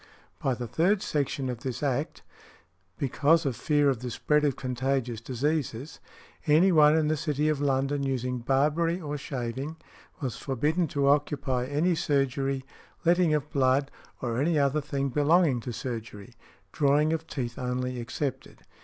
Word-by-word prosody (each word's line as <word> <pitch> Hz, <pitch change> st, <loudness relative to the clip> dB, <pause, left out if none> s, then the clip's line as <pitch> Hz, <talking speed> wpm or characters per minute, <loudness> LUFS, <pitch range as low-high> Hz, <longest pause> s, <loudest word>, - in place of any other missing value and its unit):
By 130 Hz, -2 st, +1 dB
the 120 Hz, 0 st, -5 dB
third 170 Hz, -, +1 dB
section 140 Hz, -2 st, -1 dB
of 125 Hz, -2 st, -4 dB
this 125 Hz, +1 st, -5 dB
Act, 140 Hz, +2 st, -2 dB, 0.7 s
because 150 Hz, +4 st, +2 dB
of 135 Hz, -4 st, 0 dB
fear 145 Hz, +1 st, +2 dB
of 135 Hz, -4 st, +1 dB
the 125 Hz, +1 st, -5 dB
spread 150 Hz, +6 st, +1 dB
of 145 Hz, -4 st, +2 dB
contagious 125 Hz, -2 st, -2 dB
diseases, 135 Hz, +1 st, -2 dB, 0.5 s
any 160 Hz, +6 st, +5 dB
one 155 Hz, -2 st, +6 dB
in 155 Hz, -1 st, +2 dB
the 155 Hz, -, +2 dB
City 150 Hz, 0 st, 0 dB
of 150 Hz, -2 st, 0 dB
London 140 Hz, 0 st, +1 dB
using 125 Hz, -2 st, -1 dB
barbery 150 Hz, +7 st, +1 dB
or 150 Hz, -4 st, -4 dB
shaving, 135 Hz, +2 st, -4 dB, 0.4 s
was 130 Hz, -6 st, -3 dB
forbidden 150 Hz, +6 st, 0 dB
to 140 Hz, -, -3 dB
|161| 140 Hz, -, +3 dB
occupy 140 Hz, -3 st, +1 dB
any 155 Hz, +6 st, +1 dB
surgery, 135 Hz, -3 st, 0 dB, 0.4 s
letting 170 Hz, -2 st, +4 dB
of 150 Hz, 0 st, -3 dB
blood, 135 Hz, +1 st, +2 dB, 0.3 s
or 120 Hz, 0 st, -1 dB
any 160 Hz, +2 st, +2 dB
other 140 Hz, +1 st, +2 dB
thing 140 Hz, -1 st, -2 dB
belonging 150 Hz, 0 st, +3 dB
to 120 Hz, -, -6 dB
surgery, 115 Hz, -2 st, -6 dB, 0.4 s
drawing 150 Hz, +2 st, +2 dB
of 160 Hz, 0 st, -3 dB
teeth 125 Hz, -1 st, -4 dB
only 125 Hz, 0 st, -2 dB
excepted. 130 Hz, +3 st, -5 dB
140 Hz, 155 wpm, -27 LUFS, 125-150 Hz, 0.7 s, one